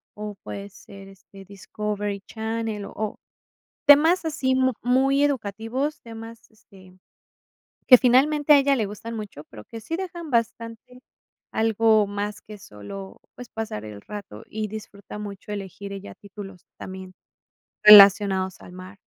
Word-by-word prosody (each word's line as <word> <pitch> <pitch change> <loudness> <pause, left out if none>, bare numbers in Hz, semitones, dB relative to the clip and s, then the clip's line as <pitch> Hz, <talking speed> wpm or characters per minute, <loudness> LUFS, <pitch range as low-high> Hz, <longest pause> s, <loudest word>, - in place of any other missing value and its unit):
o, 210 -1 -7
puede 200 0 -7
ser, 195 0 -14
este, 195 0 -16
Discovery 205 +1 -5
Channel, 220 -2 -4
o, 215 -1 -5 0.7
temas 320 +5 +6
así 285 -5 0
mu 260 -1 +2
muy 270 +3 +2
educativos, 255 +2 -2
temas, 230 0 -10
este, 190 -4 -19 0.9
que 250 - +10
finalmente 290 +4 +4
a - - +7
ella 275 0 +3
le 220 -5 -1
gustan 210 +3 -8
mucho, 205 -9 -8
pero 105 -2 -11
que, 225 - -9
sí 325 - -6
dejan 345 -4 -7
bastante 230 +1 -3 0.5
algo 220 -1 +3
más 205 +1 -5
que 210 -1 -12
solo, 190 - -10 0.2
pues, 245 -2 -10
pasar 220 - -5
el 105 -1 -9
rato, 200 - -9
y 215 0 -4
disfruta 205 -1 -10
mucho 205 0 -8
elegir 200 0 -7
ella 200 0 -9
títulos 195 -2 -12
también 185 0 -9 0.7
relacionados 200 -2 +7
al 180 - -13
mar. 185 +2 -11
210 Hz, 140 wpm, -24 LUFS, 200-240 Hz, 0.9 s, que